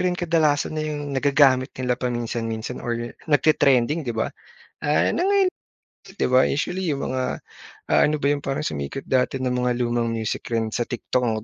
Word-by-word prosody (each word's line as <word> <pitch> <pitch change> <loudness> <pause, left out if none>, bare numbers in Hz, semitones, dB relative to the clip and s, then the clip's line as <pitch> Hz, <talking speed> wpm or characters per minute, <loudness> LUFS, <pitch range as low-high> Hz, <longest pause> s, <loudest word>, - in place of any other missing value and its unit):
rin 180 -1 +1
kadalasan 160 -4 +1
na 155 - -2
yung 145 -2 -4
nagagamit 135 -1 +3
nila 125 -1 0
paminsan-minsan 120 -1 -3
or 120 0 -3 0.2
nagte-trending 145 -1 +3
'di 120 -7 -4
ba - - -1 0.5
ah, 150 +1 +3
na 355 - +1
ngay 395 -1 +4 0.6
di - - -2
ba, 130 +1 +5
usually 175 +4 -1
yung 140 - -3
mga, 130 0 -2 0.5
ah, - - +5
ano 150 - +1
ba - - +2
'yon 145 - 0
parang 135 +1 -3
sumikat 70 - -4
dati 130 0 +1
na 125 - 0
mga 125 0 0
lumang 120 0 0
music 110 -1 -3
rin 115 -2 -1
sa 120 - -2
TikTok 115 -2 -1
130 Hz, 175 wpm, -23 LUFS, 120-150 Hz, 0.6 s, ba